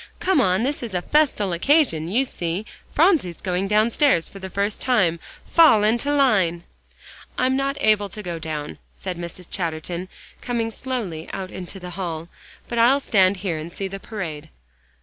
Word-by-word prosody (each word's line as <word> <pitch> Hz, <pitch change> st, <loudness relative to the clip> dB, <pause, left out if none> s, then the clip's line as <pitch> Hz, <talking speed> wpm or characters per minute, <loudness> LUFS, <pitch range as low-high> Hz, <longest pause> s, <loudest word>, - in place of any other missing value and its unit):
"Come 370 Hz, -7 st, +3 dB
on, 185 Hz, 0 st, +2 dB
this 285 Hz, +3 st, -1 dB
is 225 Hz, -6 st, -5 dB
a 180 Hz, -, 0 dB
festal 265 Hz, -, +2 dB
occasion, 175 Hz, -, +3 dB
you 240 Hz, +9 st, +1 dB
see; 175 Hz, -2 st, -3 dB, 0.3 s
Phronsie's 300 Hz, -, +2 dB
going 185 Hz, +1 st, -1 dB
downstairs 215 Hz, -, +3 dB
for 195 Hz, -, -11 dB
the 190 Hz, 0 st, -7 dB
first 200 Hz, +2 st, -1 dB
time. 195 Hz, -10 st, +2 dB, 0.3 s
Fall 310 Hz, -11 st, +6 dB
into 235 Hz, +6 st, +1 dB
line!" 195 Hz, -12 st, +2 dB, 0.7 s
"I'm 255 Hz, +1 st, +2 dB
not 275 Hz, +1 st, -1 dB
able 210 Hz, -2 st, +3 dB
to 210 Hz, +2 st, -7 dB
go 170 Hz, -3 st, -4 dB
down," 155 Hz, -2 st, -5 dB, 0.2 s
said 185 Hz, -2 st, -5 dB
Mrs. 175 Hz, +1 st, -7 dB
Chatterton, 170 Hz, +1 st, -3 dB, 0.3 s
coming 230 Hz, -2 st, -2 dB
slowly 215 Hz, -11 st, -4 dB
out 190 Hz, -1 st, -5 dB
into 185 Hz, +1 st, -7 dB
the 180 Hz, -1 st, -8 dB
hall, 170 Hz, -3 st, -5 dB, 0.4 s
"but 235 Hz, -, -2 dB
I'll 250 Hz, +5 st, +5 dB
stand 195 Hz, -7 st, +3 dB
here 170 Hz, -4 st, 0 dB
and 155 Hz, +2 st, -7 dB
see 195 Hz, +2 st, -4 dB
the 195 Hz, +1 st, -7 dB
parade." 160 Hz, -8 st, -6 dB
195 Hz, 170 wpm, -23 LUFS, 175-245 Hz, 0.7 s, Fall